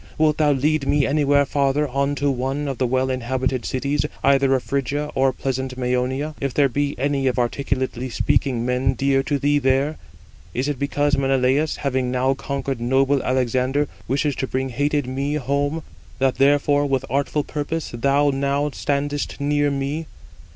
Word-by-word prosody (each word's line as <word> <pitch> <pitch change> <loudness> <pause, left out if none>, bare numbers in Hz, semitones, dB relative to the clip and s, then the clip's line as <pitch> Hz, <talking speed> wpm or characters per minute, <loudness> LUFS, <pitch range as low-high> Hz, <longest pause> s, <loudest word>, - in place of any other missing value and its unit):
Wilt 155 -1 +3
thou 150 -1 +4
lead 145 +1 +1
me 145 -1 +3
anywhere 145 -1 +3
farther 140 +1 +1
on 140 +2 0
to 145 0 +1
one 135 +3 -2
of 135 -2 -4
the 130 - +2
well 130 +1 +1
inhabited 130 0 -1
cities, 140 +2 -1 0.2
either 135 -1 +4
of 130 - -1
Phrygia 140 +2 -2
or 135 0 +3
pleasant 130 -1 -3
Mæonia, 130 +4 -1
if 140 -2 -2
there 145 -1 +4
be 145 +2 -1
any 135 +1 0
of 130 - 0
articulately 130 0 -1
speaking 120 0 0
men 125 +1 +1
dear 135 +2 +2
to 145 +1 -1
thee 145 +1 +2
there? 135 +3 +1 0.6
Is 130 +3 0
it 145 -3 -2
because 145 +1 +1
Menelaus, 135 +3 +2
having 130 -3 -1
now 130 +1 +1
conquered 135 -2 -4
noble 135 +3 +2
Alexander, 130 +3 0 0.2
wishes 140 +1 0
to 130 - -2
bring 130 +1 -2
hated 145 +3 0
me 135 +3 -2
home, 145 +3 -1 0.3
that 135 0 +1
therefore 145 +1 +3
with 135 -1 0
artful 140 +2 0
purpose 155 +2 -4
thou 140 +4 +2
now 140 +2 0
standest 145 +1 -2
near 145 0 +1
me? 140 +3 -3
140 Hz, 165 wpm, -22 LUFS, 130-145 Hz, 0.6 s, thou